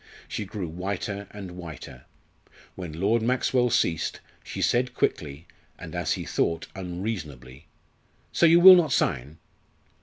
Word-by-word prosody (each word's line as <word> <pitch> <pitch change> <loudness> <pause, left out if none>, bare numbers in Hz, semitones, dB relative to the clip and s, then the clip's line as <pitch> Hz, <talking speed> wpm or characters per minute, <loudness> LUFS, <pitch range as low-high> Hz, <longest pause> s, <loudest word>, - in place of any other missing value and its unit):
She 105 - -4
grew 95 -2 -5
whiter 100 +4 -4
and 100 -3 -9
whiter. 80 -8 -10 0.7
When 85 -4 -8
Lord 110 +5 +2
Maxwell 125 +1 +1
ceased, 80 -7 0 0.2
she - - -7
said 125 0 +1
quickly, 75 +2 -2 0.3
and - - -10
as - - -1
he - - -5
thought 85 0 -1
unreasonably 85 - -6 0.7
"So 170 - +4
you 170 +1 +6
will 185 +1 +11
not 165 -5 +2
sign?" 70 - -1
95 Hz, 130 wpm, -26 LUFS, 80-115 Hz, 0.7 s, will